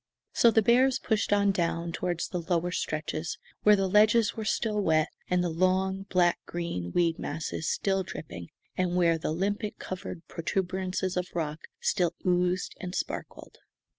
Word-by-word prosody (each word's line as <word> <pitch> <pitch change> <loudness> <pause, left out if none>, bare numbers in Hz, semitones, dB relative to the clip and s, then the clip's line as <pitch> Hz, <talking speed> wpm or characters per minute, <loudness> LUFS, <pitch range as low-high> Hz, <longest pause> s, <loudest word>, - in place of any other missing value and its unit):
So 235 - +6
the 220 -1 +4
bears 255 +3 +4
pushed 220 -2 0
on 200 -1 +4
down 170 -2 -1
toward 175 0 -2
the 180 - -2
lower 175 0 0
stretches, 155 -1 -3 0.2
where 210 0 +6
the 195 -1 +1
ledges 210 +3 +4
were 220 - -5
still 215 -1 0
wet, 160 -3 +2 0.2
and 180 0 +2
the 175 - 0
long, 190 +3 +1
black 175 -2 +3
green 170 - -4
weed 170 -2 +1
masses 155 +1 -3
still 195 -1 +1
dripping, 90 - -7 0.3
and 180 -1 0
where 170 -2 +3
the - - -2
limpet 205 +5 -2
covered 180 -2 -7
protuberances 185 +1 -2
of 180 0 -1
rock 155 -2 -3
still 175 -2 +1
oozed 180 0 +1
and 180 0 -5
sparkled. - - -5
180 Hz, 160 wpm, -28 LUFS, 170-195 Hz, 0.3 s, So